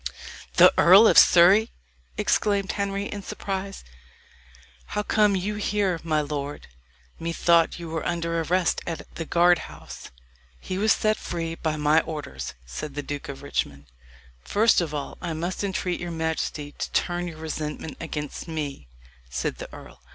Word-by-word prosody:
"The - - +8
Earl 190 +6 +8
of - - +4
Surrey!" 190 +6 +7 0.5
exclaimed 200 -2 +1
Henry, 200 0 -2
in 205 0 -5
surprise. 195 0 -5 1.1
"How 210 - +1
come 210 -1 +3
you 205 +3 -2
here, 200 -4 0
my 155 -2 +1
lord? 145 -1 -5 0.5
Methought 170 0 +2
you 170 -1 -7
were 160 -1 -3
under 170 -1 -1
arrest 180 +2 +1
at 165 -3 -4
the 165 - -5
guard 175 +1 +4
house." 75 +1 -11 0.5
"He 185 0 -4
was 215 +1 +3
set 215 0 +2
free 165 -1 -4
by 160 -2 -2
my 150 +1 +3
orders," 105 - -6
said 70 - -7
the 145 - -3
Duke 145 0 -6
of 140 0 -8
Richmond. 70 - -3 0.6
"First 215 - +3
of 165 -3 -3
all 145 -2 -5
I 170 -2 -3
must 175 +5 -3
entreat 185 -2 -2
your 175 - -4
majesty 160 -2 -3
to - - -5
turn 175 0 0
your 165 -2 -8
resentment 155 -1 -5
against 150 -2 -5
me," 145 - -5 0.4
said - - -3
the - - -8
earl. - - -13
165 Hz, 155 wpm, -25 LUFS, 150-190 Hz, 1.1 s, The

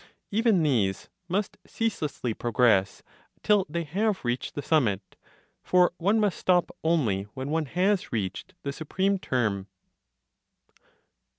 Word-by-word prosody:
Even 215 -4 +3
these 110 -10 0 0.2
must 195 +3 -2
ceaselessly 150 - -2
progress 110 -4 +2 0.4
till 205 -3 +3
they 170 +2 -2
have 195 - -1
reached 120 +1 -2
the 145 - -4
summit; 120 - +1 0.5
for 180 -1 +4
one 200 +6 +2
must 205 -4 +1
stop 180 -1 +2
only 120 - +1
when 130 +2 -4
one 160 0 0
has 185 +6 +1
reached 100 -5 -4
the 140 - -3
supreme 190 +6 -1
term. 105 - -1
160 Hz, 120 wpm, -27 LUFS, 120-190 Hz, 0.5 s, for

